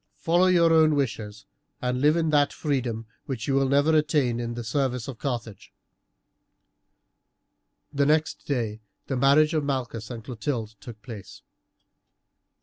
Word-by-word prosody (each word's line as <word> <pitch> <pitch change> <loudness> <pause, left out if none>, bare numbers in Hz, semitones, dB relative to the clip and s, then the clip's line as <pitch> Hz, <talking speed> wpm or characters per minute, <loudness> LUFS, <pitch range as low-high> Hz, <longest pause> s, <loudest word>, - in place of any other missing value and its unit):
Follow 175 +3 +3
your 170 -2 +4
own 155 -1 +5
wishes, 110 -6 -3 0.3
and 125 0 -2
live 150 +3 +4
in 160 -2 +1
that 145 -1 +3
freedom 125 -7 -2 0.2
which 125 -5 -4
you 140 - +1
will 135 -1 +2
never 145 +3 +3
attain 145 -6 +1
in 120 0 -4
the 120 - -5
service 125 0 -1
of 130 -4 -7
Carthage." 120 -6 -5 2.2
The 140 0 +2
next 155 +1 0
day 115 -6 -2 0.2
the 135 - -3
marriage 140 +5 +4
of 155 -2 +1
Malchus 125 -5 -3
and 115 -3 -7
Clotilde 115 -2 -4
took 110 +1 -11
place. 110 -6 -10
135 Hz, 145 wpm, -25 LUFS, 115-150 Hz, 2.2 s, own